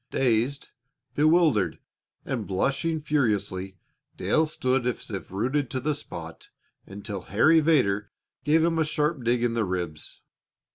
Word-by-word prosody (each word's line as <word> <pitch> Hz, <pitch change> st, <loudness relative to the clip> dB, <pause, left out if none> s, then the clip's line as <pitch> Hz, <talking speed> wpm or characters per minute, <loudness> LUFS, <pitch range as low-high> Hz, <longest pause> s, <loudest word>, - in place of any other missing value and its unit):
Dazed, 125 Hz, +2 st, 0 dB, 0.4 s
bewildered, 155 Hz, -, +3 dB, 0.5 s
and 115 Hz, -6 st, -3 dB
blushing 140 Hz, -, 0 dB
furiously, 105 Hz, -10 st, -1 dB, 0.4 s
Dale 160 Hz, 0 st, +2 dB
stood 130 Hz, -4 st, 0 dB
as 120 Hz, -1 st, -4 dB
if 100 Hz, -2 st, -5 dB
rooted 125 Hz, +8 st, -1 dB
to 130 Hz, -, -2 dB
the 150 Hz, +4 st, 0 dB
spot 85 Hz, -, -8 dB, 0.4 s
until 100 Hz, 0 st, -6 dB
Harry 155 Hz, +11 st, +5 dB
Vedder 105 Hz, -11 st, +2 dB, 0.3 s
gave 155 Hz, +3 st, +3 dB
him 165 Hz, -1 st, +1 dB
a -, -, +4 dB
sharp 150 Hz, -2 st, -1 dB
dig 120 Hz, +1 st, +1 dB
in 120 Hz, -1 st, +1 dB
the 115 Hz, -1 st, +1 dB
ribs. 90 Hz, -5 st, -5 dB
125 Hz, 135 wpm, -26 LUFS, 100-150 Hz, 0.5 s, Harry